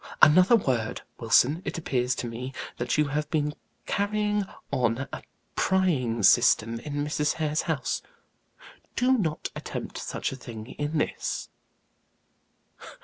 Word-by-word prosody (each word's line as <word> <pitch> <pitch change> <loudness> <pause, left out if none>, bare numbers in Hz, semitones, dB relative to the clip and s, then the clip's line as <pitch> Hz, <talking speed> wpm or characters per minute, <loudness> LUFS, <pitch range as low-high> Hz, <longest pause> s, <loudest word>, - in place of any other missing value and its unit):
Another 180 +9 +7
word, 125 - 0 0.2
Wilson; 125 +7 +4
it - - -4
appears 130 -5 0
to 120 - -3
me 125 +3 -6 0.2
that 120 +3 -1
you 150 -1 +2
have 150 +1 -2
been 150 -2 0 0.3
carrying 210 0 0 0.3
on 125 +2 0
a - - -5 0.3
prying 140 - +1
system 115 +1 +5
in 145 +3 -3
Mrs. 150 0 0
Hare's 155 -1 0
house 160 -5 -1 0.9
do 255 +1 +4
not 165 -10 -1
attempt - - -5
such - - -3
a - - -5
thing 115 -4 -8
in 150 +2 -1
this." - - -2
145 Hz, 130 wpm, -27 LUFS, 125-165 Hz, 0.9 s, Another